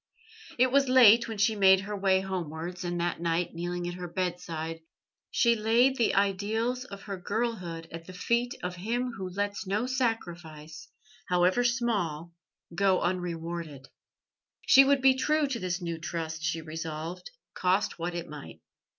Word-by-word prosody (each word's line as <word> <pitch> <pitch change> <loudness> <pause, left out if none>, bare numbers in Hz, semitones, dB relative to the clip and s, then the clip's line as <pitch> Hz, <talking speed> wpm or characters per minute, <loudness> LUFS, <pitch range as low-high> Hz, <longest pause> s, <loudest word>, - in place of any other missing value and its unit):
It 255 +1 +4
was 275 0 +3
late 240 -3 +7
when 225 -2 -5
she 215 +2 +2
made 190 -2 +6
her 205 +2 -5
way 190 -1 +2
homewards, 175 -1 -5
and 175 0 -2
that 170 -1 -2
night, 170 +1 0
kneeling 175 +1 -3
at 175 - -4
her 180 0 -6
bedside, 170 -2 -4 0.5
she 235 -2 +3
laid 230 +4 +3
the 230 - +2
ideals 215 +6 0
of 200 -5 -10
her 200 -2 -5
girlhood 180 -7 -3
at 165 0 -9
the 185 - -9
feet 235 +7 0
of 180 0 -4
Him 240 +7 -2
Who 190 -5 -6
lets 200 +2 -3
no 205 +5 0
sacrifice, 175 - -4 0.4
however 180 +6 +3
small, 205 -10 -1 0.4
go 190 +1 +3
unrewarded. 170 -5 -4 0.8
She 270 - +8
would 275 -1 +2
be 265 -1 +7
true 300 +3 +1
to 265 -4 -3
this 180 -1 -3
new 170 -1 -4
trust, 160 -1 -4
she 165 0 -1
resolved, 160 - -6 0.2
cost 185 0 0
what 175 +1 -3
it 170 -1 -4
might. 150 -2 -10
185 Hz, 160 wpm, -28 LUFS, 170-230 Hz, 0.8 s, She